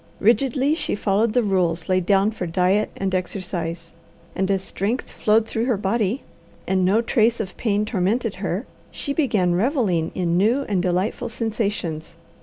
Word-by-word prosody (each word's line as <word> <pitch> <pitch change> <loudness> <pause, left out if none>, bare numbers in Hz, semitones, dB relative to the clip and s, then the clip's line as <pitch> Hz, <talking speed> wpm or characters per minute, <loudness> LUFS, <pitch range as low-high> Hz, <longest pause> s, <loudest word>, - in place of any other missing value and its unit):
Rigidly 265 +5 +3
she 320 - -1
followed 210 +2 +1
the 245 -1 +3
rules 180 -5 0
laid 185 -1 +1
down 200 +1 +4
for 185 -5 -4
diet 185 +5 +2
and 195 -1 -2
exercise, 175 -3 -3 0.4
and 190 0 0
as 195 -1 +1
strength 215 +6 -2
flowed 220 +1 +2
through 225 +1 -1
her 245 -4 +1
body, 210 +4 0 0.4
and 190 -1 +1
no 205 +6 +3
trace 230 0 +2
of 195 -4 -4
pain 210 -2 0
tormented 215 +1 0
her, 190 +4 -2 0.2
she 280 - -4
began 215 - +1
revelling 195 - +1
in 175 -2 0
new 230 +9 +3
and 200 -7 0
delightful 185 +3 -1
sensations. 205 -8 -3
200 Hz, 160 wpm, -22 LUFS, 185-230 Hz, 0.4 s, down